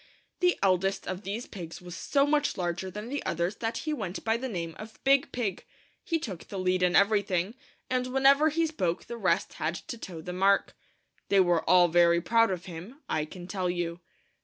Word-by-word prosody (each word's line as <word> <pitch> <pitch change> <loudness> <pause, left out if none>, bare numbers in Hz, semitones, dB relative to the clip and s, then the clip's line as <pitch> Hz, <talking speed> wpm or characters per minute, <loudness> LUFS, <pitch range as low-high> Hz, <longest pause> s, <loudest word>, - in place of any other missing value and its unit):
The 360 -1 +3
eldest 195 0 +2
of 185 +1 -3
these 210 +4 -4
pigs 170 -5 -8
was 180 -1 -9
so 280 +8 +2
much 290 0 +1
larger 175 +1 -2
than 210 +5 -7
the 285 +1 -3
others 175 +4 -1
that 225 0 -2
he 310 - 0
went 200 -9 -4
by 225 0 +2
the 260 +3 -3
name 170 -6 -4
of 220 +1 -9
Big 275 +1 +3
Pig. 210 -7 -2 0.4
He 330 - 0
took 195 - -7
the 200 - -6
lead 185 0 +1
in 180 -1 +3
everything, 200 -1 +2 0.3
and 255 0 0
whenever 275 +4 +5
he 330 +2 +1
spoke 185 - -2
the 235 - -6
rest 190 -5 0
had 155 +2 0
to 235 - -7
toe 175 -6 -7
the 180 +3 -6
mark. 195 +2 +2 0.5
They 200 - +5
were 175 -3 +3
all 180 -1 +7
very 170 0 +4
proud 230 +5 +3
of 185 -1 -3
him, 185 - -9
I 155 -1 0
can 175 +3 -10
tell 185 -1 -2
you. 175 -1 -2
195 Hz, 205 wpm, -28 LUFS, 175-235 Hz, 0.5 s, all